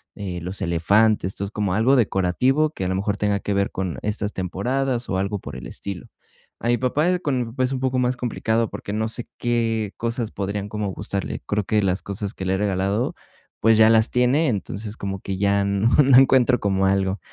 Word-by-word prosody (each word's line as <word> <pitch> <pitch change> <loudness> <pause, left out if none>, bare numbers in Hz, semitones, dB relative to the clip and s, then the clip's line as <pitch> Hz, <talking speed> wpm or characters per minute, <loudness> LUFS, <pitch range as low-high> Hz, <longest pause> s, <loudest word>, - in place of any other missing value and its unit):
eh, 95 -4 -5
los 90 +3 -6
elefantes, 95 +4 +2
entonces 100 0 -4
como 100 -4 -1
algo 115 +7 +3
decorativo 125 +7 +2
que 95 -11 -5
a - - 0
lo 95 - 0
mejor 100 +1 -1
tenga 100 -1 0
que 100 0 -2
ver 100 0 +1
con 95 -2 -3
estas 105 0 -1
temporadas, 120 +7 -2
o 95 - 0
algo 100 +1 -1
por - - -9
el - - -8
estilo. 100 -3 -6 0.5
A 120 - -3
mi 120 - +3
papá, 140 +7 +1
eh, 180 -1 +1
con 125 -6 -2
pues, 130 -1 +1
es - - -3
un 130 - -2
poco 130 -1 0
más 125 0 +1
complicado, 115 -2 -1
porque 100 - -6
no 110 +1 -1
sé 115 +1 -6
qué 115 -3 -1
cosas 115 -1 -2
podrían 100 +1 -4
como 105 -1 -3
gustarle. 100 +1 -4
Creo 105 -1 0
que 105 +1 +2
las 95 -1 0
cosas 100 +1 -4
que 95 - -6
le 95 - +1
he - - +1
regalado, 100 +3 0 0.4
pues, 110 0 +4
ya 110 0 +7
las 110 -1 +4
tiene, 125 +6 +3
entonces 105 0 -4
como 95 -1 -4
que 95 0 -4
ya 100 0 +2
no 100 +3 +1
no 135 -1 +5
encuentro 130 -2 +5
como 95 -1 +1
algo. 95 0 +1
105 Hz, 215 wpm, -23 LUFS, 100-120 Hz, 0.5 s, ya